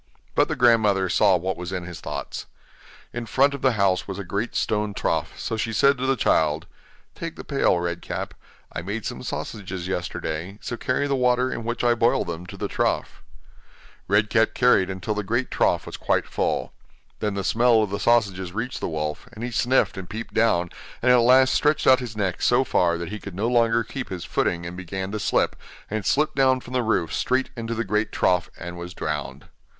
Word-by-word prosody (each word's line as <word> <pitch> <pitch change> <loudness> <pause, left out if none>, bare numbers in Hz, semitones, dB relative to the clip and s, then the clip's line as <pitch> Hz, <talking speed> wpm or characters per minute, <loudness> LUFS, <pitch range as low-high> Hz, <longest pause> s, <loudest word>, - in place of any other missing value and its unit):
But - - +3
the - - -2
grandmother 110 -6 +4
saw 100 -1 +4
what 95 +2 -2
was 90 +1 -6
in 95 -2 -3
his 85 -1 -8
thoughts. - - -5 0.7
In 120 -1 -5
front 140 +4 +3
of 140 - -6
the 130 -2 +3
house 100 -3 +1
was 95 -1 -5
a 100 - -4
great 100 +5 -3
stone 105 -2 0
trough, - - -1
so 115 - -3
she 115 - -1
said 140 +4 +3
to 130 - -1
the 135 - +3
child: 80 -7 +2 0.5
'Take - - -6
the - - -8
pail, - - +2
Red 85 0 -3
Cap; - - -5 0.4
I - - -3
made 100 +5 -4
some - - -4
sausages 95 -4 -5
yesterday, 90 0 -4
so 120 - -4
carry 130 +4 -1
the 140 -1 +1
water 125 0 +2
in 115 - -5
which 120 +1 -3
I 120 0 +4
boiled 120 0 +2
them 85 +1 -6
to - - -9
the - - -2
trough.' - - -1 0.9
Red 105 +2 +2
Cap 115 0 +3
carried 125 -7 +4
until 95 +3 -3
the 105 - -2
great 120 +6 -1
trough - - +1
was - - -7
quite - - +1
full. - - -2 0.5
Then 105 -2 -1
the 100 - -2
smell 115 +2 +4
of 105 - -3
the 100 - -2
sausages 100 -6 +1
reached 115 +4 -3
the - - -3
wolf, 75 +4 -3
and 110 0 -8
he 120 - -3
sniffed 120 -2 +2
and 95 -2 -7
peeped 115 +2 -6
down, 90 -6 +2 0.3
and 125 - +5
at 125 - +7
last 130 +2 +5
stretched 150 0 +2
out 130 -1 +7
his 120 -4 -7
neck 95 -4 -1
so 125 +2 +4
far 85 -8 +2
that 85 -1 -5
he 105 +1 -5
could 100 -4 -9
no 105 +5 0
longer 115 -1 +3
keep 125 +3 -6
his 90 -3 -5
footing 85 -1 -1
and 85 +1 -6
began 95 +1 -5
to 105 - -3
slip, - - +1 0.4
and 110 -2 -2
slipped 150 +2 +2
down 130 -1 +4
from 125 - -11
the 125 - +2
roof 100 -9 0
straight 130 +1 0
into 115 -1 -4
the 115 - -1
great 105 +1 0
trough, 90 -1 +1
and 85 0 -7
was 90 +1 -7
drowned. 75 -2 -4
105 Hz, 215 wpm, -24 LUFS, 90-120 Hz, 0.9 s, at